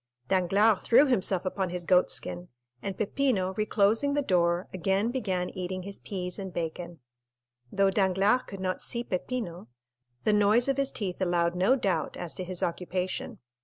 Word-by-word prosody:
Danglars 195 Hz, +2 st, +3 dB
threw 255 Hz, +5 st, +5 dB
himself 190 Hz, -8 st, +1 dB
upon 185 Hz, 0 st, -1 dB
his 175 Hz, -1 st, -5 dB
goat 180 Hz, +1 st, +4 dB
skin, 90 Hz, 0 st, -3 dB, 0.3 s
and 195 Hz, +5 st, -4 dB
Peppino, 215 Hz, -4 st, 0 dB
reclosing 215 Hz, +6 st, +2 dB
the 290 Hz, -, +1 dB
door, 175 Hz, -3 st, +1 dB
again 195 Hz, +5 st, 0 dB
began 190 Hz, -8 st, -2 dB
eating 185 Hz, -1 st, -4 dB
his 200 Hz, +1 st, -6 dB
peas 180 Hz, -1 st, -5 dB
and 190 Hz, -1 st, -5 dB
bacon. 170 Hz, 0 st, -5 dB, 0.7 s
Though 195 Hz, -1 st, +3 dB
Danglars 195 Hz, +5 st, +3 dB
could 195 Hz, -, -8 dB
not 185 Hz, -1 st, -2 dB
see 235 Hz, -1 st, -2 dB
Peppino, 185 Hz, -, -4 dB, 0.6 s
the 215 Hz, -, +3 dB
noise 210 Hz, +4 st, +4 dB
of 275 Hz, -1 st, +1 dB
his 275 Hz, -1 st, +1 dB
teeth 190 Hz, -3 st, -4 dB
allowed 175 Hz, -2 st, +1 dB
no 190 Hz, +9 st, +3 dB
doubt 200 Hz, -8 st, -1 dB
as 175 Hz, -2 st, -5 dB
to 185 Hz, -, -5 dB
his 180 Hz, -1 st, -4 dB
occupation. 180 Hz, +2 st, -3 dB
190 Hz, 165 wpm, -28 LUFS, 180-215 Hz, 0.7 s, threw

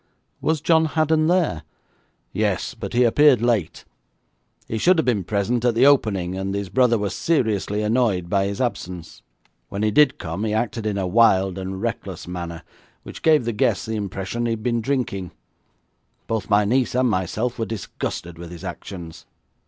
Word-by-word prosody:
'Was 160 Hz, -2 st, 0 dB
John 160 Hz, -1 st, +4 dB
Haddon 155 Hz, 0 st, +2 dB
there?' 170 Hz, -, +1 dB, 0.7 s
'Yes; -, -, -1 dB
but -, -, -7 dB
he 125 Hz, +1 st, +4 dB
appeared 135 Hz, +2 st, +5 dB
late. 115 Hz, -7 st, -1 dB, 0.8 s
He 110 Hz, -, -3 dB
should 180 Hz, +8 st, +4 dB
have 160 Hz, -, +1 dB
been 115 Hz, -6 st, +1 dB
present 110 Hz, +5 st, -1 dB
at 120 Hz, -2 st, +2 dB
the 125 Hz, +3 st, +5 dB
opening, 100 Hz, -10 st, +2 dB
and 95 Hz, +1 st, -3 dB
his 100 Hz, -2 st, -3 dB
brother 125 Hz, 0 st, +3 dB
was 100 Hz, -3 st, -2 dB
seriously 105 Hz, -, 0 dB
annoyed 105 Hz, -5 st, +1 dB
by 100 Hz, +1 st, +1 dB
his 100 Hz, 0 st, -4 dB
absence. 90 Hz, -8 st, -4 dB, 0.5 s
When 100 Hz, +1 st, -3 dB
he 110 Hz, -, +2 dB
did 145 Hz, +4 st, +4 dB
come 85 Hz, +3 st, -5 dB
he 110 Hz, -1 st, -1 dB
acted 110 Hz, -1 st, -2 dB
in 105 Hz, -2 st, -1 dB
a 95 Hz, -, -1 dB
wild 95 Hz, -2 st, +3 dB
and 95 Hz, +2 st, -5 dB
reckless 100 Hz, -7 st, -4 dB
manner, 85 Hz, -2 st, -6 dB, 0.4 s
which -, -, -10 dB
gave 155 Hz, -6 st, +4 dB
the 120 Hz, -, -1 dB
guests 105 Hz, -, +1 dB
the 110 Hz, 0 st, -3 dB
impression 100 Hz, +3 st, -3 dB
that -, -, 0 dB
he -, -, 0 dB
had 110 Hz, -1 st, -6 dB
been 120 Hz, -1 st, 0 dB
drinking. 110 Hz, -9 st, -2 dB, 0.9 s
Both 110 Hz, -3 st, -3 dB
my 105 Hz, 0 st, +4 dB
niece 125 Hz, +3 st, +1 dB
and 130 Hz, 0 st, +3 dB
myself 110 Hz, +4 st, -1 dB
were 115 Hz, -, 0 dB
disgusted 85 Hz, -5 st, -5 dB
with 85 Hz, -1 st, -8 dB
his 85 Hz, -1 st, -10 dB
actions.' 85 Hz, -4 st, -8 dB
110 Hz, 180 wpm, -22 LUFS, 95-125 Hz, 0.9 s, appeared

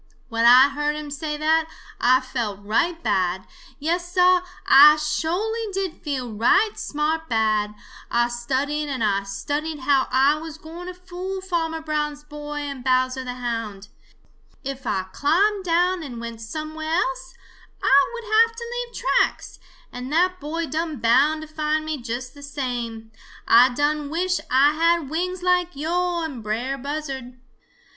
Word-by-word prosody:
"When 230 Hz, 0 st, +1 dB
I 255 Hz, +3 st, +8 dB
heard 295 Hz, +1 st, -1 dB
him 300 Hz, -1 st, -6 dB
say 300 Hz, +1 st, -4 dB
that, 315 Hz, +1 st, +2 dB, 0.3 s
Ah 255 Hz, +2 st, +5 dB
felt 220 Hz, -6 st, -4 dB
right 330 Hz, +11 st, 0 dB
bad. 190 Hz, -3 st, 0 dB, 0.3 s
Yes, 345 Hz, +4 st, -2 dB
Sah, 365 Hz, 0 st, +5 dB, 0.3 s
Ah 295 Hz, +3 st, +9 dB
sho'ly 360 Hz, +9 st, -2 dB
did 385 Hz, -3 st, -3 dB
feel 260 Hz, -6 st, -4 dB
right 250 Hz, -, +3 dB
smart 315 Hz, +2 st, -2 dB
bad. 215 Hz, -2 st, +1 dB, 0.3 s
Ah 240 Hz, 0 st, +2 dB
studied 270 Hz, +5 st, -2 dB
and 260 Hz, -4 st, -2 dB
Ah 200 Hz, -2 st, +2 dB
studied 290 Hz, +10 st, -4 dB
how 270 Hz, 0 st, +2 dB
Ah 275 Hz, +4 st, +3 dB
was 320 Hz, -1 st, -8 dB
gwine 330 Hz, +3 st, -9 dB
to 365 Hz, -, -7 dB
fool 365 Hz, +1 st, -6 dB
Farmer 330 Hz, -4 st, -2 dB
Brown's 300 Hz, -1 st, -2 dB
boy 295 Hz, 0 st, -6 dB
and 280 Hz, -3 st, -6 dB
Bowser 255 Hz, 0 st, +1 dB
the 250 Hz, -1 st, -5 dB
Hound. 230 Hz, -5 st, -4 dB, 0.7 s
If 270 Hz, 0 st, -6 dB
Ah 190 Hz, -2 st, -1 dB
climbed 390 Hz, +7 st, +2 dB
down 355 Hz, +1 st, +2 dB
and 255 Hz, -6 st, -7 dB
went 230 Hz, -1 st, -7 dB
somewhere 310 Hz, +6 st, -4 dB
else, 365 Hz, +8 st, -2 dB, 0.5 s
Ah 275 Hz, +1 st, +5 dB
would 470 Hz, -, -6 dB
have 455 Hz, +1 st, +3 dB
to 470 Hz, -, -7 dB
leave 485 Hz, 0 st, -5 dB
tracks, -, -, 0 dB, 0.3 s
and 250 Hz, +2 st, -7 dB
that 365 Hz, +3 st, +2 dB
boy 325 Hz, +3 st, -3 dB
done 315 Hz, +1 st, -3 dB
bound 275 Hz, +6 st, +3 dB
to -, -, -9 dB
find 310 Hz, 0 st, -1 dB
me 310 Hz, -4 st, -4 dB
just 245 Hz, +2 st, -5 dB
the 285 Hz, -, -14 dB
same. 245 Hz, -6 st, -5 dB, 0.4 s
Ah 245 Hz, +2 st, +7 dB
done 295 Hz, 0 st, 0 dB
wish 360 Hz, +3 st, 0 dB
Ah 275 Hz, +3 st, +5 dB
had 335 Hz, -3 st, +2 dB
wings 360 Hz, +3 st, -2 dB
like 360 Hz, -2 st, +1 dB
yo' 345 Hz, +3 st, -1 dB
and 280 Hz, -7 st, -5 dB
Brer 230 Hz, +6 st, -2 dB
Buzzard. 270 Hz, -3 st, -5 dB
295 Hz, 155 wpm, -23 LUFS, 255-335 Hz, 0.7 s, Ah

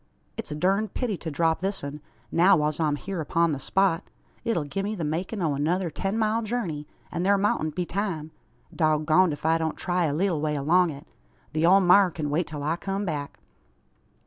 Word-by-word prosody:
"It's -, -, -6 dB
a 150 Hz, -, -4 dB
durned 195 Hz, +6 st, 0 dB
pity 240 Hz, -6 st, -1 dB
to 165 Hz, -, -5 dB
drop 160 Hz, +2 st, +1 dB
this 195 Hz, -1 st, -3 dB
un, 145 Hz, +1 st, -6 dB, 0.3 s
now 180 Hz, +3 st, +5 dB
whiles 150 Hz, 0 st, 0 dB
I'm 150 Hz, -3 st, +1 dB
hyur 185 Hz, +3 st, -4 dB
upon 165 Hz, +2 st, +1 dB
the 140 Hz, -, -2 dB
spot. 190 Hz, +3 st, +1 dB, 0.3 s
It'll 225 Hz, -9 st, 0 dB
gie 145 Hz, +7 st, -3 dB
me 210 Hz, +2 st, -2 dB
the 175 Hz, -, -4 dB
makin' 175 Hz, +6 st, -2 dB
o' 155 Hz, -3 st, +1 dB
another 165 Hz, +5 st, 0 dB
ten 195 Hz, +6 st, -2 dB
mile 220 Hz, +1 st, +1 dB
jurney, 200 Hz, -10 st, -3 dB, 0.2 s
an 175 Hz, 0 st, -2 dB
thur 200 Hz, +2 st, +4 dB
moutn't 155 Hz, -6 st, 0 dB
be 180 Hz, -, -1 dB
time. 175 Hz, -5 st, -3 dB, 0.4 s
Dog 155 Hz, -2 st, +2 dB
goned 175 Hz, +3 st, +4 dB
ef 145 Hz, -, -8 dB
I 165 Hz, +1 st, +3 dB
don't 160 Hz, -1 st, -2 dB
try 180 Hz, -1 st, 0 dB
a 145 Hz, -, 0 dB
leetle 175 Hz, -2 st, 0 dB
way 150 Hz, -1 st, 0 dB
along 170 Hz, +5 st, +3 dB
it. 140 Hz, -2 st, -8 dB, 0.5 s
The 155 Hz, +2 st, +2 dB
ole 195 Hz, +2 st, +6 dB
maar 185 Hz, +1 st, +6 dB
kin 155 Hz, -3 st, -4 dB
wait 165 Hz, +4 st, 0 dB
till 150 Hz, -2 st, -6 dB
I 160 Hz, +3 st, 0 dB
kum 195 Hz, +2 st, -3 dB
back." 145 Hz, -5 st, -4 dB
170 Hz, 210 wpm, -26 LUFS, 155-195 Hz, 0.5 s, ole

